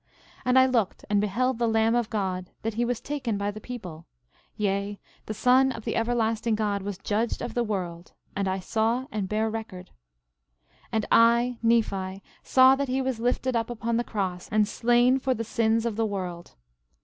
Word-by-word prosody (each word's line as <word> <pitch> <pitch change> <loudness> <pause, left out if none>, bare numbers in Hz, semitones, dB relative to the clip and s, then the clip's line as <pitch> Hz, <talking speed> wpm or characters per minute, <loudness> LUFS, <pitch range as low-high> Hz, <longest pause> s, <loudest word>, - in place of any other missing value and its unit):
And 250 +1 +3
I 260 - +7
looked 235 -7 0
and 205 -1 +3
beheld 240 +4 0
the 235 - +2
Lamb 225 0 +2
of 240 -2 0
God, 185 -4 -2
that 225 0 -2
he 235 +3 0
was 240 -1 -1
taken 260 -7 -3
by 200 +1 -1
the 215 +1 -10
people; 180 -11 -8 0.5
yea, 200 0 -1 0.3
the 215 - -3
Son 260 +4 +4
of 225 - -8
the - - -2
everlasting 230 -1 0
God 205 -2 -1
was 200 -1 -5
judged 215 +4 -1
of - - -5
the 240 - +1
world; 180 -5 -4 0.2
and 200 -1 -1
I 190 0 -1
saw 225 +6 0
and 200 -3 -3
bear 215 +1 0
record. 215 -5 -6 1.0
11:33 - - -31
And 220 -1 +1
I, 235 +1 +4
Nephi, 195 -5 0 0.2
saw 260 0 +6
that 280 0 -2
he 260 +1 0
was 260 -3 -2
lifted 245 +1 0
up 230 0 0
upon 235 -1 -2
the 240 - +1
cross 185 -6 -3
and 215 -1 +2
slain 240 +4 +3
for 260 -1 0
the 230 - -3
sins 225 0 +1
of 225 -3 -2
the 225 - +1
world. 180 -4 -5
225 Hz, 195 wpm, -26 LUFS, 200-240 Hz, 1.0 s, I